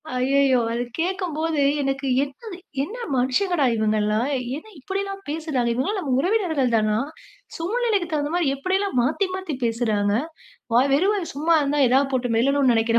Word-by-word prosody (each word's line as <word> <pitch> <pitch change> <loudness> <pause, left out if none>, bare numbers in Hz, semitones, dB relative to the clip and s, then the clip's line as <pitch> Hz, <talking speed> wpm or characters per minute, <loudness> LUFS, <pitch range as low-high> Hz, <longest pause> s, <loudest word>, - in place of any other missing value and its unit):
ஐயய்யோ! 265 0 +3
அத 235 +1 -1 0.2
கேக்கும்போது 330 -3 -1 0.2
எனக்கு, 270 0 -2 0.2
"என்னது 345 - -8 0.3
என்ன 420 - -6 0.2
மனுஷங்கடா 280 +6 +1
இவங்கலாம்? 215 +1 +1 0.3
என்ன 310 - -11
இப்படிலாம் 390 +5 -4
பேசுறாங்க? 300 -6 -1
இவங்கலாம் 315 - -1
நம்ம 290 -8 -3
உறவினர்கள் 330 - +1
தானா? 215 -1 +2 0.6
சூழ்நிலைக்கு 410 +1 0
தகுந்த 295 0 -1
மாரி 350 -4 +1
எப்படியெல்லாம் 380 +3 -1
மாத்தி 310 +11 +1
மாத்தி 375 -6 -4
பேசுறாங்க? 220 -3 0 0.6
வாய் 260 +4 +4
வெறும் 375 +9 +3
வாய் 380 -5 -3
சும்மா 320 +4 +2
இருந்தா 290 0 0
எதாவது 270 +2 +3
போட்டு 250 -2 0
மெல்லணும்னு 270 +2 +3
நெனைக்கிற 230 +1 +2
285 Hz, 145 wpm, -23 LUFS, 250-360 Hz, 0.6 s, வாய்